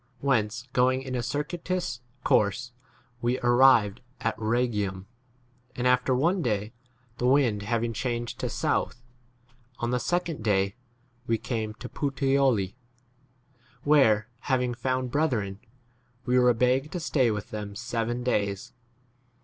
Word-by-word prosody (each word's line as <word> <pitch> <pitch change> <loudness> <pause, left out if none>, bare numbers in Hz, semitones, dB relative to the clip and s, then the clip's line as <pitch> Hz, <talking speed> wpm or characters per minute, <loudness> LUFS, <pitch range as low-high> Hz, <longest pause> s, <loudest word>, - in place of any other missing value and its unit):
Whence, 120 -2 0
going 130 +1 +2
in 130 -1 -5
a 125 - 0
circuitous 150 +1 -3 0.2
course, 115 +5 +2 0.5
we 120 +2 0
arrived 120 -4 +5 0.2
at 115 - -1
Ehegium; 110 -4 -1 0.7
and 125 - -2
after 125 +1 +3
one 170 +8 +2
day, 105 -4 -1 0.5
the 125 - +1
wind 125 -6 +3
having 115 +2 -1
changed 120 0 -3
to - - -2
south, 125 - -1 0.7
on 120 0 -2
the 125 - +1
second 170 -4 -1
day 100 -2 +2 0.5
we 115 - +2
came 110 -2 -3
to - - -8
14 140 -2 -2
Puteoli, 115 -9 +2 1.1
where, 115 -8 +4
having 125 -2 0
found 130 0 -2
brethren, 115 -11 0 0.7
we 125 0 +3
were 125 0 +5
begged 130 +5 +1
to 180 - -2
stay 140 -7 +2
with 105 -2 -4
them 105 -1 -5
seven 120 +1 -2
days. 105 0 -1
120 Hz, 130 wpm, -27 LUFS, 110-130 Hz, 1.1 s, arrived